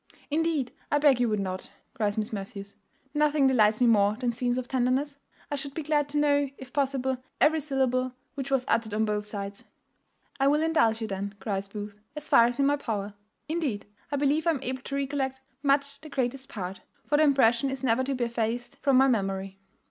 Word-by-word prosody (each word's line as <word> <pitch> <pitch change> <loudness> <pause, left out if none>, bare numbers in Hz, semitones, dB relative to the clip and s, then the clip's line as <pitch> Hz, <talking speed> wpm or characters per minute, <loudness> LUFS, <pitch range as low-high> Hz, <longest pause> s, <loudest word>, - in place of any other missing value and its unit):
"Indeed, 310 -5 0 0.2
I 290 - +4
beg 285 -4 +4
you 245 -2 +2
would 210 -1 0
not," 185 -1 -4 0.2
cries 210 -2 -1
Miss 215 +1 -2
Matthews; 200 0 -6 0.4
"nothing 300 -1 +3
delights 220 -5 +4
me 250 - +4
more 210 -3 +4
than 245 0 -1
scenes 245 +1 0
of 255 -1 -3
tenderness. 265 +3 0 0.4
I - - +1
should 280 0 -4
be 320 - -3
glad 295 -1 +1
to 295 - -2
know, 285 -1 +3
if 260 -2 -11
possible, 265 -2 0 0.2
every 315 +1 +4
syllable 260 -3 0 0.2
which 275 -1 -5
was 270 -2 +1
uttered 225 -2 0
on 220 +1 +2
both 210 -1 -2
sides." 200 -1 -6 0.8
"I 270 - +4
will 300 +2 +3
indulge 230 -9 +2
you 220 - -2
then," 200 0 -4
cries 195 0 -2
Booth, 205 0 -6 0.2
"as 300 0 -4
far 235 - +7
as 240 +1 0
is 280 - -1
in - - +4
my 290 +1 +3
power. 210 -6 -3 0.3
Indeed, 300 -10 -2 0.3
I - - +1
believe 290 +3 +1
I - - +6
am 285 -5 0
able 255 0 -3
to 275 - -5
recollect 270 -1 -1 0.2
much 280 0 +1
the 310 - -10
greatest 270 0 -2
part; 190 -4 -6 0.2
for 295 - +2
the 310 - +5
impression 270 -3 +4
is 270 0 -5
never 250 0 +2
to 275 0 -1
be 250 - -1
effaced 235 +1 -2
from 275 -2 +3
my 265 +1 +6
memory." 195 -4 -1
255 Hz, 210 wpm, -28 LUFS, 220-280 Hz, 0.8 s, far